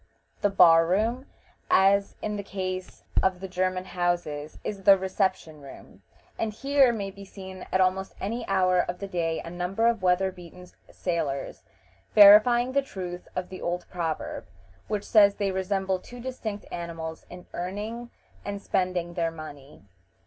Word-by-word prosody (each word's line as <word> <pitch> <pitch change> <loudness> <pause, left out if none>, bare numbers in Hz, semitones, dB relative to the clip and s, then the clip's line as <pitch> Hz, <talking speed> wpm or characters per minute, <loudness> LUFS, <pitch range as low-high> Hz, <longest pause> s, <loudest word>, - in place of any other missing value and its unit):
The 205 - +3
bar 165 -4 +6
room, 225 +8 0 0.4
as 200 +1 +4
in 210 -1 -2
the 205 - -3
case 185 -2 -5 0.2
of 190 -1 +1
the 190 - -6
German 185 0 -1
houses, 175 -5 -2
is 200 -2 -4
the 195 0 +7
reception 185 -5 -2
room, 140 - -13 0.4
and 225 - -1
here 270 +3 +3
may 200 -4 -4
be 200 +1 -12
seen 190 -1 -10
at 185 - +2
almost 190 +1 +1
any 230 +5 -3
hour 185 -2 +3
of 175 0 -1
the 200 - -6
day 165 -3 -2
a 165 - -8
number 180 +5 -1
of 230 -3 +2
weather 185 +1 +2
beaten 180 0 -13 0.2
sailors, 155 -6 -3 0.5
verifying 220 +4 +8
the 280 +1 +2
truth 180 -8 -7
of 185 0 -3
the 185 - -9
old 175 +1 -2
proverb, 165 -3 -4 0.4
which 210 -1 -2
says 200 -2 +5
they 200 -1 -1
resemble 190 0 -1
two 245 +6 -12
distinct 235 -5 -5
animals 165 -2 -6
in 180 0 -11
earning 210 +7 -5 0.3
and 200 0 -4
spending 180 -3 -1
their 170 -1 0
money. 150 -6 -11
190 Hz, 155 wpm, -26 LUFS, 175-205 Hz, 0.5 s, verifying